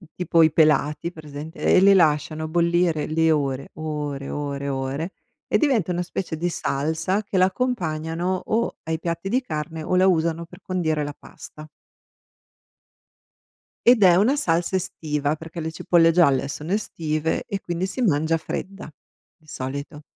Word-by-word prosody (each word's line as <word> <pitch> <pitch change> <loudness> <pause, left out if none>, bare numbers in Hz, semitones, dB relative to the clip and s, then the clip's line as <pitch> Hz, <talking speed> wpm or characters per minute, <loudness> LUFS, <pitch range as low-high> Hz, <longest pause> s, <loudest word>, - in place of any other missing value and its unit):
Tipo 170 -2 +3
i 160 - +4
pelati, 155 +1 +2
presente? 155 0 -9
E - - +4
li 195 +1 +6
lasciano 155 -2 +2
bollire 170 -1 +1
le 160 +1 +2
ore, 140 -3 -1
ore, 150 -3 -4
ore, 140 -1 -4
ore 135 +6 -3 0.4
e - - +3
diventa 245 - +1
una 175 0 -1
specie 175 -1 -4
di 175 +3 -1
salsa 160 +6 -1
che 200 -1 -3
la 185 - +6
accompagnano 180 -5 -2
o 230 +2 -1
ai 160 0 -2
piatti 170 +2 -3
di 250 +6 +1
carne 160 - -5
o 170 - -1
la 185 +1 +5
usano 170 -2 +1
per 175 +2 -15
condire 160 -5 -1
la 145 0 -5
pasta. 155 0 -12 2.2
Ed 240 -3 +6
è 180 -2 +7
una 220 +10 +3
salsa 175 - 0
estiva, 150 -4 -2
perché 165 +2 -9
le 160 0 -3
cipolle 165 +1 +3
gialle 140 -6 +3
sono 150 +4 -5
estive 160 -6 -2
e 200 -4 -3
quindi 175 +1 -2
si 195 +7 -4
mangia 160 -6 +2
fredda 185 +2 -6 0.5
di 155 -3 -28
solito. 140 +3 -6
160 Hz, 155 wpm, -23 LUFS, 150-180 Hz, 2.2 s, è